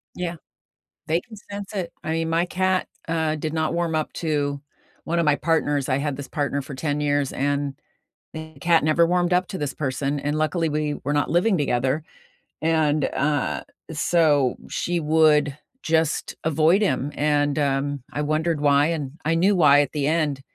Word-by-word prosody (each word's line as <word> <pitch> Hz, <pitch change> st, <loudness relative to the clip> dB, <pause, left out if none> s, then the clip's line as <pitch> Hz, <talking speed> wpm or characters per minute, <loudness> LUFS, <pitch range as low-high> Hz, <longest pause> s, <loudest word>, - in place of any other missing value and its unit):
Yeah, 175 Hz, -1 st, -3 dB, 0.7 s
they 165 Hz, +3 st, +1 dB
can 225 Hz, -, -13 dB, 0.2 s
sense 200 Hz, +1 st, -6 dB
it. 180 Hz, -4 st, -3 dB
I 160 Hz, -, -3 dB
mean 165 Hz, 0 st, -1 dB
my 165 Hz, +2 st, +2 dB
cat, 185 Hz, +1 st, 0 dB, 0.2 s
uh, 160 Hz, -1 st, 0 dB
did 155 Hz, +1 st, -4 dB
not 160 Hz, 0 st, 0 dB
warm 170 Hz, -2 st, 0 dB
up 155 Hz, -, -2 dB
to 145 Hz, -3 st, -1 dB, 0.4 s
one 170 Hz, +1 st, -1 dB
of 170 Hz, -, +2 dB
my 150 Hz, -1 st, +4 dB
partners 145 Hz, -3 st, 0 dB
I 130 Hz, -, +2 dB
had 145 Hz, -1 st, -2 dB
this 140 Hz, -2 st, -7 dB
partner 140 Hz, -1 st, -2 dB
for 140 Hz, +1 st, -8 dB
10 145 Hz, +1 st, -2 dB
years, 145 Hz, -2 st, +1 dB
and 140 Hz, 0 st, -1 dB, 0.6 s
the 160 Hz, 0 st, -8 dB
cat 165 Hz, -2 st, +3 dB
never 165 Hz, +2 st, +4 dB
warmed 175 Hz, 0 st, +1 dB
up 180 Hz, +1 st, +3 dB
to 190 Hz, -, -5 dB
this 145 Hz, -2 st, -3 dB
person, 140 Hz, 0 st, -2 dB
and 145 Hz, +1 st, -1 dB
luckily, 160 Hz, +1 st, 0 dB
we 150 Hz, 0 st, -1 dB
were 145 Hz, -, 0 dB
not 145 Hz, 0 st, 0 dB
living 185 Hz, +4 st, +3 dB
together, 135 Hz, +1 st, 0 dB, 0.6 s
and, 155 Hz, -2 st, +2 dB
uh, 145 Hz, 0 st, -1 dB, 0.3 s
so 155 Hz, -4 st, +2 dB
she 175 Hz, 0 st, -1 dB
would 150 Hz, -2 st, +3 dB, 0.3 s
just 160 Hz, -1 st, 0 dB
avoid 160 Hz, +5 st, +3 dB
him, 145 Hz, -7 st, 0 dB
and, 145 Hz, -1 st, +1 dB
um, 140 Hz, -1 st, 0 dB
I 150 Hz, -, -2 dB
wondered 155 Hz, +1 st, 0 dB
why, 145 Hz, +1 st, +4 dB
and 150 Hz, -5 st, -3 dB
I 165 Hz, +2 st, +2 dB
knew 190 Hz, +4 st, +3 dB
why 145 Hz, -4 st, +6 dB
at 145 Hz, -, -2 dB
the 145 Hz, -2 st, -1 dB
end, 150 Hz, -4 st, 0 dB
155 Hz, 180 wpm, -23 LUFS, 145-165 Hz, 0.7 s, why